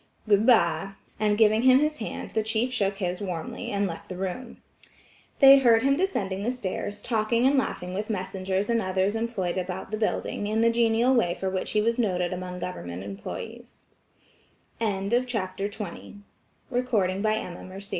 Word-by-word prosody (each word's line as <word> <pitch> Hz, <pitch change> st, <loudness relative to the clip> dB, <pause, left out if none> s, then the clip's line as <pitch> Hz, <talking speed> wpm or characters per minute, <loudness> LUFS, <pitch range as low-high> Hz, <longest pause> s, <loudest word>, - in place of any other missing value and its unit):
"Good 210 Hz, +2 st, +4 dB
bye," 195 Hz, -4 st, +3 dB, 0.3 s
and 210 Hz, -1 st, +2 dB
giving 215 Hz, 0 st, +4 dB
him 255 Hz, +1 st, +6 dB
his 300 Hz, +2 st, 0 dB
hand, 220 Hz, -, -5 dB
the 220 Hz, -, +1 dB
chief 220 Hz, +3 st, -1 dB
shook 200 Hz, -4 st, 0 dB
his 180 Hz, -1 st, -3 dB
warmly, 175 Hz, -5 st, -5 dB
and 200 Hz, 0 st, 0 dB
left 165 Hz, -3 st, -6 dB
the 185 Hz, -, -6 dB
room." 195 Hz, +7 st, -5 dB, 0.8 s
They 275 Hz, -1 st, +9 dB
heard 235 Hz, -3 st, +4 dB
him 275 Hz, +1 st, +3 dB
descending 200 Hz, -, -1 dB
the 220 Hz, -, -1 dB
stairs, 205 Hz, -3 st, -4 dB
talking 230 Hz, +1 st, +1 dB
and 275 Hz, +2 st, +4 dB
laughing 180 Hz, -9 st, -1 dB
with 210 Hz, +3 st, -4 dB
messengers 190 Hz, -1 st, -2 dB
and 230 Hz, -1 st, +1 dB
others 190 Hz, +1 st, 0 dB
employed 225 Hz, -6 st, -2 dB
about 185 Hz, +2 st, -5 dB
the 215 Hz, -, -1 dB
building, 210 Hz, -1 st, -2 dB
in 220 Hz, +1 st, +1 dB
the 230 Hz, 0 st, +4 dB
genial 230 Hz, +2 st, +3 dB
way 175 Hz, -9 st, +2 dB
for 190 Hz, -1 st, -3 dB
which 185 Hz, -1 st, -3 dB
he 210 Hz, -1 st, +2 dB
was 230 Hz, +2 st, 0 dB
noted 180 Hz, -5 st, 0 dB
among 180 Hz, 0 st, -5 dB
government 95 Hz, -, -6 dB
employe 100 Hz, 0 st, -7 dB
210 Hz, 150 wpm, -26 LUFS, 185-230 Hz, 0.8 s, They